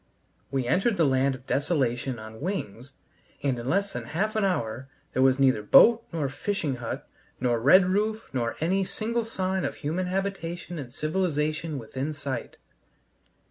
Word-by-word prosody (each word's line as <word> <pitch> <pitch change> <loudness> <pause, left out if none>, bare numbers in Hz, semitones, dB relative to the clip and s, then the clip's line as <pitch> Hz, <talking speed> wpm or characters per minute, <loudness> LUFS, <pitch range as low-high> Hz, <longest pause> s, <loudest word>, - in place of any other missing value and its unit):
We 135 -2 -1
entered 195 - +2
the 165 - +4
land 135 0 +2
of 130 0 -14
desolation 135 -4 0
on 110 +1 -10
wings, 140 - -4 0.5
and 135 -4 0
in 120 +2 -4
less 200 +4 +1
than 120 -1 -5
half 200 - -1
an 215 - +1
hour 130 - -1 0.2
there 130 - +1
was 130 0 +5
neither 130 -5 +3
boat 230 - +7
nor 160 -5 -1
fishing 145 -1 -2
hut 120 -2 -5 0.3
nor 120 -2 +1
red 180 +10 +6
roof, 215 +4 0
nor 120 -3 -1
any 185 +5 +1
single 230 +4 -2
sign 190 -4 -1
of - - -2
human 170 +5 -2
habitation 180 -3 -3
and 130 -4 -7
civilization 155 0 -1
within 130 +5 -4
sight. 140 -4 -5
150 Hz, 160 wpm, -27 LUFS, 130-190 Hz, 0.5 s, boat